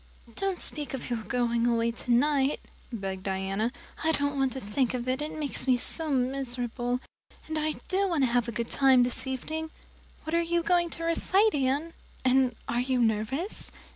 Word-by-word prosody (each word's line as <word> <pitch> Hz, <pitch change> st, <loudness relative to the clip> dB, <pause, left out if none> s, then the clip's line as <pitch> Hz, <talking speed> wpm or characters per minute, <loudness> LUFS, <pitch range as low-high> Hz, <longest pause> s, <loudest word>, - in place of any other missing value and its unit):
"Don't 390 Hz, -2 st, 0 dB
speak 295 Hz, -3 st, -3 dB
of 255 Hz, -, -5 dB
your 235 Hz, -2 st, -1 dB
going 235 Hz, 0 st, 0 dB
away 235 Hz, -1 st, +2 dB
tonight," 265 Hz, +4 st, +2 dB, 0.3 s
begged 195 Hz, -4 st, -4 dB
Diana. 195 Hz, +4 st, -1 dB, 0.3 s
"I 320 Hz, -, +4 dB
don't 285 Hz, -1 st, +1 dB
want 270 Hz, -1 st, +1 dB
to 265 Hz, -, -4 dB
think 245 Hz, +4 st, 0 dB
of 245 Hz, 0 st, -4 dB
it, 260 Hz, +2 st, 0 dB
it 300 Hz, -, -3 dB
makes 290 Hz, -2 st, -2 dB
me 255 Hz, -1 st, +5 dB
so 320 Hz, +5 st, +1 dB
miserable, 250 Hz, -2 st, -1 dB, 0.5 s
and 315 Hz, -, -4 dB
I 310 Hz, 0 st, 0 dB
do 390 Hz, +1 st, +2 dB
want 330 Hz, -6 st, +1 dB
to 250 Hz, -, +2 dB
have 245 Hz, 0 st, +2 dB
a -, -, -2 dB
good 235 Hz, +1 st, -3 dB
time 265 Hz, -2 st, +6 dB
this 245 Hz, +2 st, -2 dB
evening. 315 Hz, +5 st, -3 dB, 0.5 s
What 315 Hz, -, -5 dB
are 335 Hz, -, +4 dB
you 340 Hz, 0 st, 0 dB
going 345 Hz, 0 st, +2 dB
to 330 Hz, -, -7 dB
recite, 380 Hz, +6 st, +3 dB
Anne? 285 Hz, +4 st, 0 dB, 0.3 s
And 255 Hz, -1 st, +3 dB
are 240 Hz, -, 0 dB
you 255 Hz, 0 st, 0 dB
nervous?" 235 Hz, -, 0 dB
260 Hz, 185 wpm, -28 LUFS, 240-310 Hz, 0.5 s, time